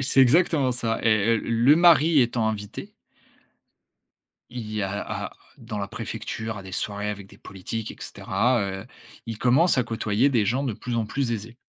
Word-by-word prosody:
et - - -1
c'est 135 +1 +3
exactement 140 0 +4
ça 115 -2 -2
et 110 0 +3
et - - +2
le 115 +7 +3
mari 165 -3 +6
étant 115 -2 0
invité 105 -2 -6 1.6
il 120 -3 -6
y 105 -1 -1
a 100 +1 -2 0.3
à - - -11 0.3
dans 105 - -6
la 100 - -3
préfecture, 110 +2 -5
à 95 - -7
des 95 - -10
soirées 105 +2 -3
avec 100 -2 -7
des - - -17
politiques 105 +3 -6
et - - -10
cetera, 120 +5 0
heu, 95 +1 -4 0.4
il 115 -2 -5
commence 135 +8 +4
à 125 - +3
côtoyer 115 +2 +1
des 115 -6 +2
gens 125 +7 0
de 130 - -1
plus 120 +4 -5
en 115 - 0
plus 125 +2 -2
aisés 115 +2 -6
115 Hz, 190 wpm, -25 LUFS, 105-125 Hz, 1.6 s, mari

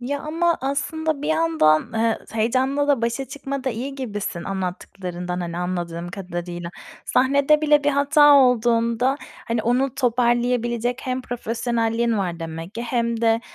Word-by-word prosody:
Ya 280 +3 -3
ama 335 +2 0
aslında 295 +2 -2
bir 300 - -2
yandan, 315 - +3
eee, 225 0 +1
heyecanla 260 +6 +1
da 275 -5 +2
başa 235 +3 -1
çıkmada 275 -1 -4
iyi 260 +5 -5
gibisin 205 -9 -4
anlattıklarından, 180 -1 -4
hani, 170 0 -4
anladığım 175 -1 -3
kadarıyla. 175 -2 -6 0.3
Sahnede 280 +3 +3
bile 295 -1 +4
bir 290 - +4
hata 290 +1 +5
olduğunda, 240 0 +3 0.3
hani, 230 -1 0
onu 250 +2 +1
toparlayabilecek 240 -1 +1
hem 255 0 -2
profesyonelliğin 230 -1 -1
var 175 -3 -3
demek 165 +4 -6
ki 235 - -4
hem 235 -1 -1
de, 225 0 +3
235 Hz, 135 wpm, -22 LUFS, 200-275 Hz, 0.3 s, hata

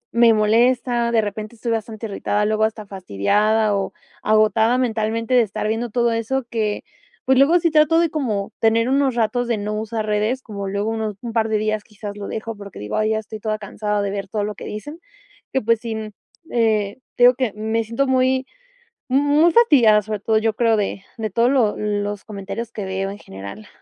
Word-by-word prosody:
me 235 -1 +6
molesta, 235 +2 +2
de 230 -1 +3
repente 215 +2 -5
estoy 230 +1 -3
bastante 225 0 -3
irritada, 210 0 -1
luego 215 +1 +2
hasta 220 -1 -4
fastidiada 205 - +1
o 195 -1 -2 0.3
agotada 215 +2 +3
mentalmente 230 -1 -1
de 250 - +6
estar 215 -1 -2
viendo 225 +2 -1
todo 235 +1 +1
eso 230 +4 -1
que, 215 -3 -1 0.4
pues, 260 0 +4
luego 315 +6 +5
sí 335 -1 +1
trato 305 +1 +4
de 335 -2 +2
como 225 -11 -2
tener 230 +2 +3
unos 270 -1 +2
ratos 240 +1 0
de 235 -2 0
no 210 +1 -3
usar 220 +1 -3
redes, 215 +5 0
como 200 -3 -6
luego 200 +3 -1
unos 220 -2 -3
un 235 -2 -5
par 225 -1 +1
de 215 - +2
días 215 0 -1
quizás 205 -1 -8
lo 205 -1 -6
dejo, 225 0 -5
porque 200 -1 -11
digo: 105 +1 -5
"Ay, 215 0 +1
ya 220 - +1
estoy 220 0 -7
toda 215 0 -2
cansada 210 0 -2
de 200 - -2
ver 200 -1 -4
todo 205 +2 -2
lo 210 +1 -3
que - - -10
dicen", 290 +10 -7 0.5
que, 265 - +1
pues, 230 +1 +2
sin, 220 -2 -5 0.4
eh, 220 -2 +1 0.2
te 245 - +2
digo 245 +1 +8
que 255 -3 -1
me 220 +2 -1
siento 230 +5 -1
muy, 260 0 +2 0.6
muy 290 +5 +4
fastidiada, 245 - +5
sobre 215 +1 -4
todo, 220 +1 +2
yo 220 0 0
creo, 230 0 +2
de 200 -2 -2
de 220 -2 -3
todo 230 +5 +2
lo 250 -6 +2
los 205 -1 -2
comentarios 205 +2 -6
que 210 - -5
veo 190 +1 -2
en 200 - -8
general. 100 - -10
220 Hz, 205 wpm, -21 LUFS, 210-235 Hz, 0.6 s, digo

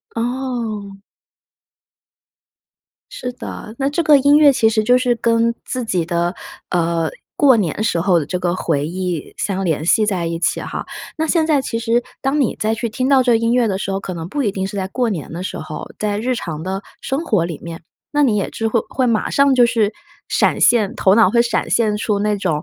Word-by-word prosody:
哦。 230 -5 -3 2.1
是 250 0 -5
的， 220 -3 -8
那 275 0 +1
这 335 +3 0
个 300 -2 +6
音 285 +2 +5
乐 290 -2 +7
其 225 -3 +3
实 220 -1 +1
就 245 +3 +4
是 250 -1 +1
跟 230 0 +1
自 255 -2 -3
己 180 -6 0
的， 175 +1 -1 0.4
呃， 170 -2 0 0.3
过 270 -4 +5
年 200 0 -1
时 170 - +1
候 175 -1 +3
的 145 - -3
这 180 - -2
个 175 -1 -1
回 145 -5 -1
忆 180 -2 -4
相 195 -1 -2
联 160 -3 -1
系 215 +5 +3
在 180 -5 -1
一 165 0 -2
起 170 - 0
哈。 - - -5 0.3
那 320 0 -1
现 320 -1 +2
在 295 -4 +3
其 230 - -3
实 235 +1 +1 0.2
当 280 +2 0
你 255 - 0
再 220 +1 0
去 230 0 -3
听 255 +4 -2
到 270 -2 +5
这 245 -1 +3
个 - - +5
音 230 +1 +1
乐 240 -3 +3
的 190 - -1
时 195 - -3
候， 195 - -2
可 185 - -6
能 165 0 -6
不 285 +7 -2
一 210 - +1
定 190 -1 -3
是 205 +1 -7
在 190 -1 -2
过 240 +2 -1
年 160 -6 -5
的 175 +2 -5
时 - - -5
候， - - -7
在 205 -1 -1
日 250 +3 -1
常 160 -8 -5
的 190 +2 -4 0.2
生 280 +5 -2
活 210 - +1
里 170 -3 -5
面。 170 0 -8 0.3
那 295 - +4
你 235 -7 +3
也 200 - -1
之 225 0 -2
会 230 - +1
会 255 -1 0
马 225 -2 +1
上 280 -1 +3
就 240 -1 +6
是 225 -3 +1 0.4
闪 - - +1
现， 220 -5 +3
头 190 +2 +3
脑 225 -5 +6
会 235 - +5
闪 235 - -1
现 215 -3 +2
出 210 -1 -1
那 210 0 +1
种， 165 -6 -1
215 Hz, 240 characters per minute, -19 LUFS, 185-245 Hz, 2.1 s, 乐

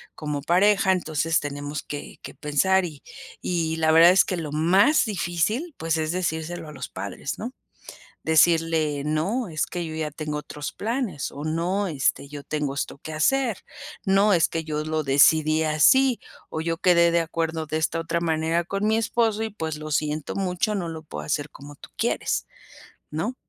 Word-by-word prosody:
como 150 -2 -4
pareja, 190 +4 +3
entonces, 160 -2 +1
tenemos 145 0 -5
que 145 - -7
que - - -9
pensar", 180 +6 +2
y 150 -4 -9 0.4
y 165 -2 -1
la 160 0 +3
verdad 165 +2 +8
es 190 - +6
que 185 - -2
lo 155 -3 -5
más 185 - +4
difícil, 210 - -1
pues, 165 0 -1
es 155 0 -1
decírselo 170 -2 -3
a - - -9
los 135 - -7
padres, 100 +7 -5
¿no?, 245 +4 -5 0.7
decirle: 160 -2 +3
"No, 185 +11 -1
es 155 -3 -1
que 175 -1 -4
yo 160 - -6
ya 155 -1 -2
tengo 150 0 -4
otros 150 0 -6
planes", 225 - -3
o, 145 - -7
"No, 175 +6 -1
este, 140 -2 0
yo 145 0 -9
tengo 150 -2 -2
esto 140 - -4
que 155 +3 -8
hacer", 245 - +1 0.5
"No, 195 +2 +4
es 170 - +4
que 165 -1 -3
yo 150 -1 -3
lo 155 0 -1
decidí 155 +3 +4
así, 245 - +4 0.3
o 160 - -3
yo 165 0 -2
quedé 170 -1 +4
de 170 - +3
acuerdo 165 -1 -2
de 155 - -1
esta 165 +1 0
otra 165 +1 -1
manera 165 +1 0
con 200 +1 -1
mi 220 - +3
esposo, 225 -1 +1
y 220 - -2
pues, 160 -7 -4
lo 155 0 -7
siento 150 0 -1
mucho, 195 +2 -1
no 180 -4 -2
lo 160 -1 -7
puedo 155 - -7
hacer 145 0 -2
como 145 +1 -12
tú - - -14
quieres", - - -1 0.6
¿no? 170 +12 -3
160 Hz, 185 wpm, -24 LUFS, 155-185 Hz, 0.7 s, verdad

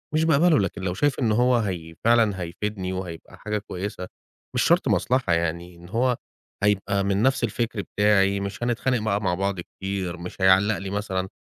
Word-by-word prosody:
مش 160 - +3
باقبله، 160 0 +4
لكن 95 0 -2
لو 90 -1 -1
شايف 145 +10 0
إن 115 -4 +2
هو 125 +3 +3
هي 85 -7 -3
فعلًا 110 -5 +3
هيفيدني، 95 +2 -4
وهيبقى 90 -3 -7
حاجة 105 0 -2
كويسة، 95 -2 -5 0.5
مش - - +3
شرط - - +3
مصلحة 125 -8 +1
يعني، 85 +1 -2
إن 85 +1 -14
هو 125 +2 +1 0.5
هيبقى 100 -1 +1
من 100 +1 +1
نفس 130 -2 +2
الفكر 115 -1 -1
بتاعي، 100 -1 +2
مش 100 +3 -5
هنتخانق 120 +1 0
بقى 105 -1 0
مع 90 - 0
بعض 95 -1 -1
كتير، 95 0 -5
مش 90 +2 -8
هيعلق 95 +2 +4
لي 95 0 -6
مثلًا 95 -2 -2
100 Hz, 180 wpm, -24 LUFS, 95-115 Hz, 0.5 s, باقبله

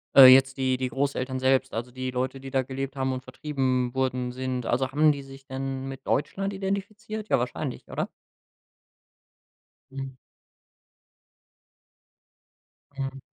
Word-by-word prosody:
Äh, 135 - +12
jetzt 135 0 +4
die 130 -1 +1
die 130 0 -1
Großeltern 130 -1 -1
selbst, 130 0 +2
also, 120 +2 -3
die 130 0 -4
Leute, 130 +1 -2
die 135 0 -8
da 135 -1 +3
gelebt 135 +1 -4
haben 130 -1 0
und 130 0 -5
vertrieben 130 -2 -1
wurden 130 -1 0
sind. 130 -1 -3
Also, 130 +2 +1
haben 150 +2 +5
die 140 - -4
sich 135 0 -12
denn 135 0 -4
mit 135 0 -8
Deutschland 195 +7 0
identifiziert, 200 +2 -4
ja, - - +4
wahrscheinlich, 125 +2 -4
oder? - - -2 1.8
Mhm. 135 -1 -6 2.8
Mhm. 135 0 -4
135 Hz, 135 wpm, -27 LUFS, 130-135 Hz, 2.8 s, Äh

